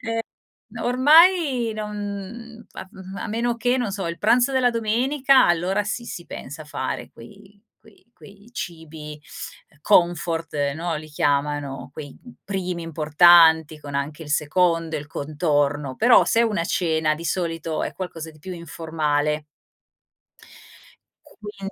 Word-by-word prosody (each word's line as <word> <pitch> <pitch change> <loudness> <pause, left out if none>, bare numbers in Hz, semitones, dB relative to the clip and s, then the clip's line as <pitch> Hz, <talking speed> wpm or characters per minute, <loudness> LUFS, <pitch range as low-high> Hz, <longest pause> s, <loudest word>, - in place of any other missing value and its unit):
ehm, 230 -2 -3 0.5
n - - -11
ormai 280 -1 +4
non, 210 -1 -5
mhmm, 210 +3 -7
a - - -7
f - - -22
mhmm, 190 -2 -10
a - - -5
meno 235 +2 -1
che, 245 +2 +1
non 240 -6 -2
so, 195 -2 -3
il 170 - -5
pranzo 240 +6 +3
della 255 -2 +3
domenica 255 +4 +3
allora 180 +4 +1
sì, 230 +3 -4
si 175 -7 -8
pensa 155 +4 -8
a - - -14
fare 130 -3 -5
quei 200 - -16 0.2
quei 220 +2 -23
quei 205 +2 -17
cibi, 160 -6 -8 0.5
uhm, 150 - -26
comfort, 165 -5 +1
no, 165 0 -3
li 155 - -8
chiamano 145 -2 -1
quei, 145 -2 -9
mhmm, 245 - -14
primi 185 -3 -3
importanti 160 0 +5
con 145 -1 -9
anche 145 +3 -3
il 150 - -10
secondo, 165 +2 +1
il 150 - -6
contorno, 145 -2 -1
però 240 +2 +6
se 230 - +2
è - - +5
una 210 -7 0
cena 160 -3 +1
di 165 +2 -9
solito 165 -3 -2
è - - -5
qualcosa 165 -4 -7
di 155 - -19
più 185 +5 -7
informale 155 -3 -2 1.8
quind 200 -2 -9
175 Hz, 150 wpm, -23 LUFS, 155-215 Hz, 1.8 s, però